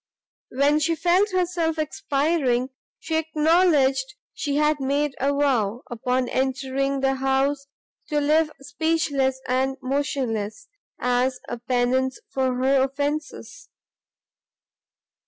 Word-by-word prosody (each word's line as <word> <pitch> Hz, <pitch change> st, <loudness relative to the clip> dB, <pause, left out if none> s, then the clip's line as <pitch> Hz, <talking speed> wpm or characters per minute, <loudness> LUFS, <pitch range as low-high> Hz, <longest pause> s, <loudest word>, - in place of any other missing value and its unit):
"When 285 Hz, +3 st, +2 dB
she 330 Hz, +2 st, +1 dB
felt 365 Hz, +5 st, +2 dB
herself 350 Hz, -3 st, 0 dB
expiring, 280 Hz, -5 st, 0 dB, 0.3 s
she 325 Hz, -8 st, -2 dB
acknowledged 305 Hz, -4 st, +2 dB, 0.2 s
she 285 Hz, -2 st, -2 dB
had 300 Hz, 0 st, +2 dB
made 280 Hz, +1 st, 0 dB
a 275 Hz, +2 st, +1 dB
vow, 250 Hz, -6 st, 0 dB
upon 250 Hz, +2 st, -1 dB
entering 270 Hz, +1 st, -1 dB
the 270 Hz, 0 st, +2 dB
house, 270 Hz, +1 st, 0 dB, 0.4 s
to 300 Hz, -1 st, 0 dB
live 305 Hz, +2 st, +3 dB
speechless 285 Hz, -2 st, 0 dB
and 265 Hz, +1 st, 0 dB
motionless, 255 Hz, -6 st, -2 dB, 0.3 s
as 250 Hz, +1 st, +1 dB
a 240 Hz, -, -5 dB
pennance 255 Hz, +2 st, 0 dB
for 260 Hz, -1 st, 0 dB
her 265 Hz, +1 st, +3 dB
offences! 290 Hz, +2 st, -3 dB
275 Hz, 105 wpm, -24 LUFS, 260-305 Hz, 0.4 s, live